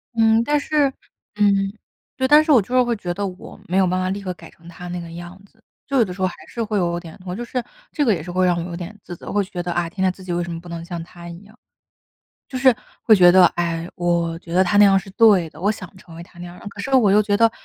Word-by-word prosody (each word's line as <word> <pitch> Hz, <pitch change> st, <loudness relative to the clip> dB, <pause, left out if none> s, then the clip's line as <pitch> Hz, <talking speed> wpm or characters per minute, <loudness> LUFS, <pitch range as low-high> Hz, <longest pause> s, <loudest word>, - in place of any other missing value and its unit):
嗯， 225 Hz, 0 st, +4 dB
但 295 Hz, +3 st, +1 dB
是 295 Hz, -1 st, +1 dB, 0.5 s
嗯。 200 Hz, -1 st, +2 dB, 0.4 s
对， 260 Hz, -, +1 dB
但 300 Hz, +2 st, +7 dB
是 310 Hz, -, +1 dB
我 265 Hz, -, +7 dB
就 230 Hz, +5 st, -3 dB
是 255 Hz, -, +6 dB
会 240 Hz, -1 st, 0 dB
觉 180 Hz, -4 st, -4 dB
得 200 Hz, +2 st, -3 dB
我 185 Hz, -1 st, -10 dB
没 180 Hz, -, 0 dB
有 190 Hz, -, +4 dB
办 185 Hz, +1 st, 0 dB
法 185 Hz, -, -1 dB
立 200 Hz, +2 st, -3 dB
刻 185 Hz, -, -3 dB
改 -, -, -14 dB
成 170 Hz, 0 st, -19 dB
他 175 Hz, +1 st, -10 dB
那 175 Hz, 0 st, -4 dB
个 170 Hz, -1 st, -9 dB
样 175 Hz, +2 st, -9 dB
子， 220 Hz, +2 st, -29 dB, 0.2 s
就 275 Hz, -, -1 dB
有 235 Hz, -, +5 dB
的 180 Hz, -, -7 dB
时 180 Hz, -, -9 dB
候 185 Hz, -, +2 dB
还 185 Hz, -, -2 dB
是 235 Hz, -, -4 dB
会 215 Hz, -1 st, -3 dB
有 170 Hz, -1 st, -1 dB
点 165 Hz, -2 st, -11 dB
我 180 Hz, 0 st, -5 dB
就 240 Hz, -, -5 dB
是 250 Hz, 0 st, -3 dB, 0.3 s
这 295 Hz, -, 0 dB
个 235 Hz, -, +3 dB
也 165 Hz, -6 st, -1 dB
是 175 Hz, -, -7 dB
会 185 Hz, +1 st, +1 dB
让 180 Hz, -1 st, +2 dB
我 170 Hz, -, -2 dB
有 -, -, -5 dB
点 185 Hz, +5 st, -8 dB
自 175 Hz, -, -8 dB
责， -, -, -9 dB
会 205 Hz, -1 st, +1 dB
觉 185 Hz, -2 st, -6 dB
得， 175 Hz, -, -4 dB
啊， 175 Hz, 0 st, -1 dB
天 185 Hz, +3 st, -7 dB
天 185 Hz, -, +3 dB
自 185 Hz, +1 st, -14 dB
己 180 Hz, -, -4 dB
为 175 Hz, 0 st, -1 dB
什 175 Hz, -, -6 dB
么 165 Hz, -, -5 dB
不 175 Hz, -, -14 dB
能 170 Hz, -1 st, -6 dB
像 170 Hz, -1 st, -6 dB
他 170 Hz, 0 st, -12 dB
一 170 Hz, -, -9 dB
样。 215 Hz, +3 st, -19 dB, 0.9 s
就 265 Hz, -, -6 dB
是 255 Hz, 0 st, +5 dB, 0.3 s
会 220 Hz, -, +6 dB
觉 175 Hz, -1 st, +7 dB
得， 185 Hz, 0 st, +7 dB
唉， 170 Hz, -1 st, -2 dB
我 170 Hz, -1 st, 0 dB
觉 170 Hz, 0 st, -11 dB
得 185 Hz, -, +5 dB
他 190 Hz, +3 st, +1 dB
那 205 Hz, -, +8 dB
样 195 Hz, -1 st, +5 dB
是 195 Hz, 0 st, -2 dB
对 195 Hz, -6 st, +4 dB
的， 155 Hz, -, -15 dB
我 200 Hz, -, +2 dB
想 185 Hz, -1 st, -11 dB
成 175 Hz, -3 st, -15 dB
为 170 Hz, -, -9 dB
他 175 Hz, 0 st, -17 dB
那 175 Hz, -, -7 dB
样。 175 Hz, 0 st, -10 dB
可 200 Hz, -, -10 dB
是 270 Hz, -, -5 dB
我 225 Hz, -7 st, +5 dB
又 210 Hz, -, +5 dB
觉 205 Hz, -1 st, +1 dB
得， 230 Hz, +1 st, +4 dB
185 Hz, 325 characters per minute, -21 LUFS, 175-215 Hz, 0.9 s, 那